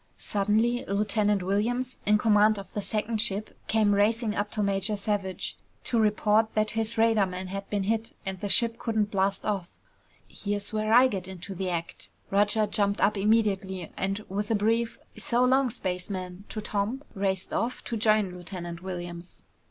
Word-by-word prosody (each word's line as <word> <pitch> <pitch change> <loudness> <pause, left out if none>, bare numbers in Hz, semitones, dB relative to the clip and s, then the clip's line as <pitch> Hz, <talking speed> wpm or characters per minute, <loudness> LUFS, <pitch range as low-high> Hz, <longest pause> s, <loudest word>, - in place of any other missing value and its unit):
Suddenly, 220 +5 +1
Lieutenant 205 -1 +1
Williams, 240 +7 -1
in 210 0 +6
command 210 0 +4
of 195 - -9
the 205 - -2
second 215 +1 -1
ship, 215 -1 -3
came 215 -2 +3
racing 215 +2 +2
up 205 -1 -1
to 210 - -1
Major 200 +1 0
Savage, 200 -2 -2 0.3
to 235 - +1
report 215 +1 +2
that 215 0 +2
his 225 +1 0
radarman 195 -5 +2
had 195 +1 -5
been 205 -2 0
hit 225 +2 0
and 190 -1 -3
the 205 - -3
ship 230 +2 +2
couldn't 220 -3 0
blast 195 0 0
off. 195 -4 -1 0.6
"Here's 205 +1 -4
where 215 0 0
I 250 +3 +8
get 190 -6 -4
into 190 +1 -7
the 190 0 -3
act!" 170 -1 -4 0.2
Roger 205 +2 +3
jumped 205 -1 +1
up 210 - +3
immediately, 195 -3 +1
and 195 +2 -2
with 205 +2 -3
a 225 - +3
brief 225 +3 +1 0.2
"So 245 +1 +2
long, 260 +1 +3
spaceman" 185 -2 -4
to 215 - -4
Tom, 210 +6 -2
raced 190 -1 -2
off 240 +2 -1
to 235 - -4
join 215 -3 +3
Lieutenant 175 -1 -7
Williams. 175 -1 -7
205 Hz, 165 wpm, -27 LUFS, 195-220 Hz, 0.6 s, I